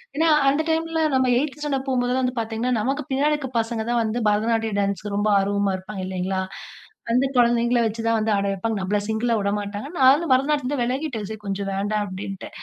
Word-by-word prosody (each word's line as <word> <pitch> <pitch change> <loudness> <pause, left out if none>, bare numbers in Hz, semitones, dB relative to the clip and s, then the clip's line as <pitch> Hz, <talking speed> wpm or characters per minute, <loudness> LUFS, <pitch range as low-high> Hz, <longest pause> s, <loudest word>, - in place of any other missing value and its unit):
ஏன்னா, 320 +2 +3 0.2
அந்த 295 +3 +1
டைம்ல 325 0 0
நம்ம 260 -1 +3
8த்து 295 +2 -2
ஸ்டாண்டர்ட் 275 -2 -2
போம்போதெல்லாம் 250 0 +1
வந்து 250 0 -1
பார்த்தீங்கன்னா, 225 +2 -2
நமக்கு 270 +7 -1
பின்னாடி 285 +3 +2
இருக்கிற 285 -4 -3
பசங்க 225 0 -2
தான் 240 -1 +2
வந்து 225 +2 -2
பரதநாட்டியம் 220 0 0
டான்ஸுக்கு 200 0 -2
ரொம்ப 210 +1 +1
ஆர்வமா 200 0 0
இருப்பாங்க 190 0 -7
இல்லைங்களா? 190 0 -2 0.7
அந்த 250 +3 +3
குழந்தைங்கள 240 0 +3
வச்சுதான் 225 +1 0
வந்து 215 0 +1
ஆட 200 - 0
வைப்பாங்க. 210 +3 -2
நம்மள 205 +2 0
சிங்கிளா 230 +2 0
வுட 200 - 0
மாட்டாங்க. 205 +4 -5
நானும் 275 +4 +5
பரதநாட்டியத்தில 275 0 +1
இருந்தே 245 - 0
விலகிட்டேன். 250 -4 -3
சரி 220 -1 -6
கொஞ்சம் 195 0 -2
வேண்டாம் 205 +2 -1
அப்படின்ட்டு. 195 0 -6
230 Hz, 185 wpm, -23 LUFS, 205-265 Hz, 0.7 s, நானும்